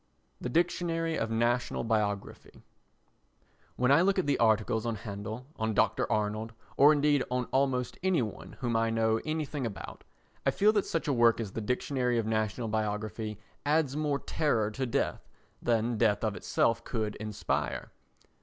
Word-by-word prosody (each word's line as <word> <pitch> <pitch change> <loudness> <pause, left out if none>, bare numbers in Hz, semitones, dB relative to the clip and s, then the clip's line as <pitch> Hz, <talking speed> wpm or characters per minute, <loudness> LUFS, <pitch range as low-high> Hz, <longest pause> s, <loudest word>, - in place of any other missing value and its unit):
The 125 - -4
Dictionary 165 +1 0
of 110 - -1
National 120 +2 0
Biography 105 -3 -2 1.1
When 125 +1 +2
I 145 +4 +6
look 195 +2 +3
at 185 - +1
the 140 -2 +1
articles 110 -1 +2
on 115 -1 -1
Handel, 110 +3 -6
on 110 -1 -1
Dr. - - +2
Arnold, 110 +1 -1 0.2
or 145 +2 +7
indeed 145 -2 +3
on 125 0 0
almost 130 -2 0
any 185 -7 +2
one 105 - -7
whom 120 -2 0
I 115 0 +2
know 110 0 +1
anything 155 -3 -2
about, 105 -6 -6 0.4
I - - +3
feel 210 +2 +3
that 205 -3 +1
such 165 -1 -2
a 145 - +2
work 120 -2 +4
as 110 -4 -3
the 110 - -4
Dictionary 125 +2 0
of 115 - 0
National 110 0 -1
Biography 110 0 -2 0.3
adds 145 -2 +1
more 150 -2 0
terror 120 -7 0
to 130 +4 -2
death 115 - -2 0.3
than 115 -1 +1
death 110 -2 +2
of 110 -2 0
itself 115 +1 +1
could 110 -3 -2
inspire. 105 -1 -3
115 Hz, 165 wpm, -30 LUFS, 110-140 Hz, 1.1 s, or